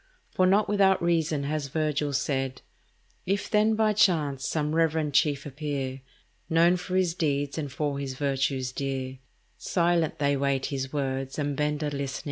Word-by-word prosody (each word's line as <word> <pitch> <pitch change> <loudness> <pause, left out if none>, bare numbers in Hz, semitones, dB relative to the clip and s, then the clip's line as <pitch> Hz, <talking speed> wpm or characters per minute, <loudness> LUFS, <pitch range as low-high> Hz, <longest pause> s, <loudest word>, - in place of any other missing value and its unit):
For 185 - +3
not 200 +3 +3
without 195 -2 +3
reason 160 -4 +1
has 145 0 -2
Virgil 150 0 -1
said— 135 -1 -2 0.6
"If 200 +2 -1
then, 215 0 +3
by 215 -1 +2
chance, 150 -10 +2
some 150 -1 -1
reverend 160 -2 +1
chief 140 -1 +2
appear, 140 -2 -4 0.5
Known 170 +2 +4
for 180 +1 -5
his 185 -3 +2
deeds 145 -3 -1
and 145 -3 -4
for 140 0 -2
his 135 -2 -4
virtues 135 -2 -1
dear, 130 -1 -4 0.4
Silent 170 -2 +1
they 140 -1 +2
wait 140 -1 0
his 135 -2 -3
words 135 -2 -2
and 145 -1 -1
bend 150 +1 -1
a 150 - -1
listening 140 -1 -3
ear." - - -4
145 Hz, 165 wpm, -27 LUFS, 135-165 Hz, 0.6 s, Known